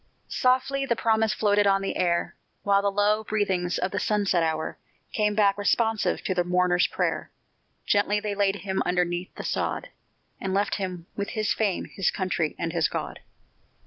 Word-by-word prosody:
Softly 260 +2 +1
the 235 - +2
promise 220 -1 +2
floated 205 -1 +2
on 195 0 +3
the 195 - -2
air, 170 -1 0 0.3
While 200 0 +3
the 200 - +1
low 205 +2 +2
breathings 190 -5 0
of 185 - -1
the 205 - -1
sunset 200 -4 +1
hour 160 -1 -2 0.3
Came 210 -1 +1
back 205 -1 +3
responsive 225 +1 +1
to 185 - 0
the 180 -1 +1
mourner's 180 0 +2
prayer. - - -2 0.6
Gently 205 0 +2
they 210 0 -3
laid 200 -1 +1
him 190 0 -2
underneath 180 0 0
the - - -6
sod, - - -2 0.5
And 190 -1 -2
left 200 0 +1
him 185 -3 -4
with 200 0 -3
his 215 -1 +1
fame, 205 -4 0
his 195 - -1
country, 175 -5 -1
and 170 -1 -3
his 165 -3 +2
God! - - -5
200 Hz, 175 wpm, -26 LUFS, 180-210 Hz, 0.6 s, on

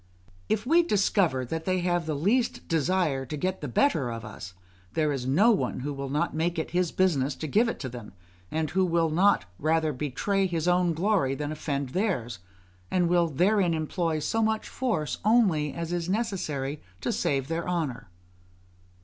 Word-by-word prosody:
If 215 +1 0
we 330 +6 +5
discover 195 - +1
that 160 +6 -4
they 185 -1 +1
have 175 -2 0
the 155 - -1
least 225 - 0
desire 165 -3 +1
to 140 +4 -5
get 185 +4 -2
the 150 - -3
better 140 - +2
of 115 -2 -6
us, 90 -4 -9 0.4
there 155 -2 +1
is 130 -3 -3
no 195 - +5
one 200 - -1
who 145 +2 -3
will 140 -1 -5
not 150 +5 0
make 165 +2 -1
it 160 - -3
his 175 -1 +1
business 145 -7 +1
to 155 - -6
give 220 - +2
it - - -4
them, 120 -6 -7 0.4
and 155 -1 -2
who 190 +2 +2
will 170 -2 +1
not 180 - +3
rather 155 0 +1
betray 170 +9 0
his 170 -2 -2
own 180 -1 +3
glory 175 -7 +1
than 150 +1 -4
offend 140 -3 -3
theirs; 130 - -1 0.5
and 175 -2 +2
will 175 -1 +3
therein 180 +3 +2
employ 160 +1 -1
so 225 +9 -1
much 220 0 0
force 220 - -2
only 195 -10 +3
as 170 0 -4
is 175 0 -2
necessary 175 - -2 0.2
to - - -1
save 135 -2 0
their 165 +2 -2
honour. 135 - -2
165 Hz, 180 wpm, -27 LUFS, 140-185 Hz, 0.5 s, we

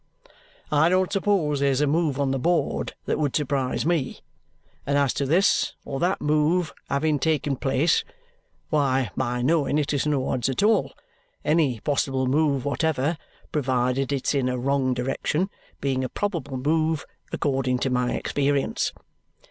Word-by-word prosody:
I 150 +2 +4
don't 185 +1 +2
suppose 190 -8 +1
there's 140 -1 +2
a 150 - +3
move 150 -1 +1
on 140 -1 +1
the 135 - -1
board 170 +5 0
that - - -1
would 145 -3 0
surprise 140 -4 0
ME, 165 -6 -1 0.6
and 140 +1 0
as 140 -3 +2
to 140 - -1
this 180 +8 +2
or 135 - -4
that 180 +2 +1
move 155 +4 +1 0.2
having 145 +1 +1
taken 145 -2 0
place, 140 +5 +2 0.7
why 135 -6 +1
my 125 -1 -1
knowing 145 0 +2
it 150 -1 0
is 145 +1 0
no 140 -3 0
odds 125 +1 0
at 135 - -1
all, 215 -1 +3 0.5
any 145 -7 +2
possible 135 -2 0
move 140 0 +1
whatever 150 +1 0 0.4
(provided 130 -1 0
it's 140 0 0
in 135 -3 +1
a 125 - -1
wrong 130 0 +1
direction) 140 +8 -1 0.3
being 135 -1 0
a 130 - -2
probable 170 -10 -3
move 155 +3 0 0.3
according 130 -3 0
to 130 +1 -1
my 125 0 +1
experience. 140 -1 0
140 Hz, 155 wpm, -25 LUFS, 130-155 Hz, 0.7 s, I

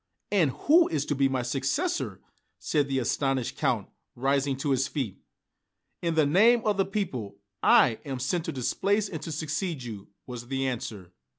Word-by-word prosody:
"And 180 -8 +4 0.2
who 330 +4 +6
is 150 -3 -1
to - - -1
be 135 0 +3
my 130 -2 -1
successor?" 140 - -1 0.4
asked 145 -3 0
the 135 -1 -1
astonished 130 0 0
Count, - - 0 0.3
rising 135 +1 +1
to 140 +1 -1
his 135 0 +2
feet. 130 - -4 0.8
"In 170 -2 0
the 155 -2 +4
name 220 +10 +5
of 210 -2 +2
the 195 - +3
people, 135 - -3 0.2
I 115 -4 +5
am 135 -3 -4
sent 160 +7 -1
to - - -2
displace 200 - 0
and 160 -5 -6
to 160 - -5
succeed 155 0 -3
you," 110 -5 -8 0.2
was 120 -1 -7
the 135 +1 -1
answer. 110 -8 -4
140 Hz, 175 wpm, -27 LUFS, 130-170 Hz, 0.8 s, who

